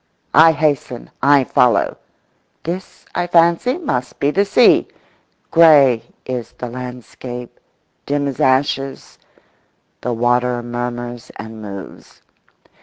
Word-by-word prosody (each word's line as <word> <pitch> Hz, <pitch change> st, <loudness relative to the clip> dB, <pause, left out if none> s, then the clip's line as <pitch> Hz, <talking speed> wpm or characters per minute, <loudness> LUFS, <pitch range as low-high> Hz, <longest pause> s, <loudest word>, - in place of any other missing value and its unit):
I 160 Hz, +2 st, +7 dB
hasten, 145 Hz, -5 st, -2 dB
I 140 Hz, 0 st, +5 dB
follow. 125 Hz, -1 st, +2 dB, 0.7 s
This, 180 Hz, +3 st, -6 dB
I 175 Hz, -, -1 dB
fancy, 170 Hz, -, +3 dB
must 125 Hz, -, -4 dB
be 140 Hz, -, +1 dB
the 200 Hz, +5 st, +2 dB
sea. 230 Hz, +4 st, +4 dB, 0.6 s
Grey 145 Hz, -8 st, +6 dB, 0.2 s
is 125 Hz, -2 st, -5 dB
the 125 Hz, -, -7 dB
landscape; 125 Hz, 0 st, -8 dB, 0.5 s
dim 145 Hz, 0 st, 0 dB
as 135 Hz, -, -5 dB
ashes; 135 Hz, +1 st, 0 dB, 0.8 s
the 125 Hz, -, -2 dB
water 120 Hz, +1 st, 0 dB
murmurs 120 Hz, 0 st, -5 dB
and 110 Hz, 0 st, -9 dB
moves. 100 Hz, -2 st, -10 dB
130 Hz, 110 wpm, -18 LUFS, 120-155 Hz, 0.8 s, I